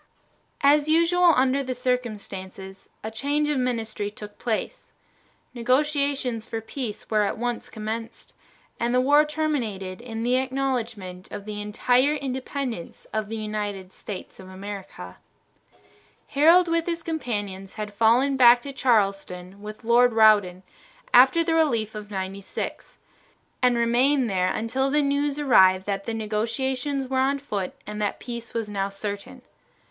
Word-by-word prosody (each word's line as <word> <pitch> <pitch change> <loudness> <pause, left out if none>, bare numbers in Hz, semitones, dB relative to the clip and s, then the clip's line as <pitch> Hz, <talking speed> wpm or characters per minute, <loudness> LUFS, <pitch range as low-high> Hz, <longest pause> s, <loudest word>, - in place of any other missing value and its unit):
As 290 +2 +4
usual 335 +2 +5
under 260 +2 +2
the 255 -2 -4
circumstances, 200 -6 -4
a 220 - -4
change 290 +6 0
of 295 -3 +1
ministry 225 -4 -2
took 210 0 -11
place. 230 -3 -3 0.6
Negotiations 260 -2 0
for 225 - -3
peace 225 -1 -6
were 215 -1 +3
at 205 - -1
once 245 +1 -3
commenced, 225 +1 -6 0.5
and 240 +1 0
the - - +5
war 290 +4 +5
terminated 235 -12 -2
in 225 -2 -5
the 250 +2 +2
acknowledgment 240 -8 -3
of 200 - -7
the 210 -1 -5
entire 250 +7 +2
independence 260 - -5
of 215 -1 -2
the 225 - -4
United 205 -3 -4
States 200 -3 -8
of 185 -1 -11
America. 190 - -8 1.1
Harold 335 +6 +5
with 335 0 0
his 335 -1 -2
companions 205 - -4
had 210 -1 -5
fallen 235 +6 +3
back 245 -2 +7
to 280 - -7
Charleston 195 -6 0
with 215 +2 -9
Lord 240 +1 +4
Rawdon 205 -5 +4 0.5
after 265 +7 +7
the 330 0 0
relief 235 -10 +1
of 210 -1 -8
Ninety 195 0 -4
six, - - -6 0.6
and 250 -1 +3
remained 245 +1 +2
there 185 -1 +1
until 260 +5 -1
the 295 +1 +2
news 285 0 0
arrived 190 -10 +5
that 200 -1 -3
the 230 - -3
negotiations 255 +6 -2
were 260 0 0
on 275 +2 +2
foot 205 -10 -4
and 210 +1 -5
that 205 - -1
peace 235 -2 -7
was 225 -2 -1
now 200 -1 -2
certain. 200 0 -6
235 Hz, 145 wpm, -25 LUFS, 205-270 Hz, 1.1 s, back